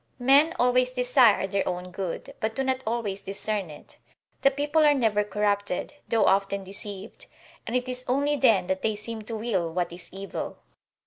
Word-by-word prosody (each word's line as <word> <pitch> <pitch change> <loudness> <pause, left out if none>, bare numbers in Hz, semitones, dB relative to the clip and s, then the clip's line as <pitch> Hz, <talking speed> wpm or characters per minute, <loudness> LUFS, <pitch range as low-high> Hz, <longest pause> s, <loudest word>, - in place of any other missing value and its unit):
Men 280 +7 +4
always 250 -2 +3
desire 250 -4 +4
their 195 0 -1
own 180 0 -5
good, 185 -1 -5
but 220 0 -2
do 270 - 0
not 260 0 0
always 220 -4 -2
discern 200 -1 -3
it; 150 - -13 0.4
the 275 - +6
people 290 +3 +1
are 295 -1 +5
never 220 -5 +2
corrupted, 205 +1 -1
though 225 -2 +2
often 195 0 +2
deceived, 195 +1 -8 0.4
and 240 - -2
it 250 0 0
is 250 0 -4
only 285 +3 +1
then 225 -10 +4
that 190 +1 -2
they 220 -1 0
seem 220 +2 -6
to 225 +2 -6
will 205 -7 -1
what 175 0 -2
is 175 0 -9
evil. 195 +1 -6
215 Hz, 180 wpm, -26 LUFS, 195-250 Hz, 0.4 s, the